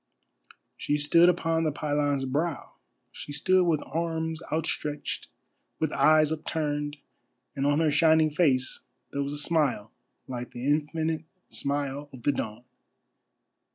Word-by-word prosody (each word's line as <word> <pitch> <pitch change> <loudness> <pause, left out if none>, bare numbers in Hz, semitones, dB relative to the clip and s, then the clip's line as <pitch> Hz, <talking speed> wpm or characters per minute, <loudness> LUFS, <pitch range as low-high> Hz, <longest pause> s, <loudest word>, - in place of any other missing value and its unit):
She 145 - 0
stood 165 +4 +5
upon 165 -2 +1
the 155 - +1
pylon's 145 -2 0
brow. 145 +3 -2 0.4
She - - -8
stood 180 +6 +3
with 155 -3 +1
arms 160 0 -2
outstretched, 150 -2 -2 0.5
with 160 -2 -1
eyes 155 -1 +4
upturned, 150 -2 -2 0.6
and 140 0 0
on 145 +1 +3
her 155 -2 +3
shining 160 +1 +4
face 140 -5 +2 0.3
there 140 - -2
was 140 +1 -2
a - - -4
smile 145 -9 0 0.4
like 125 -1 -6
the 120 +1 -6
infinite 155 +2 0 0.3
smile 140 0 -2
of 125 -3 -12
the 145 - +3
dawn. 110 -3 -4
150 Hz, 130 wpm, -27 LUFS, 140-160 Hz, 0.6 s, stood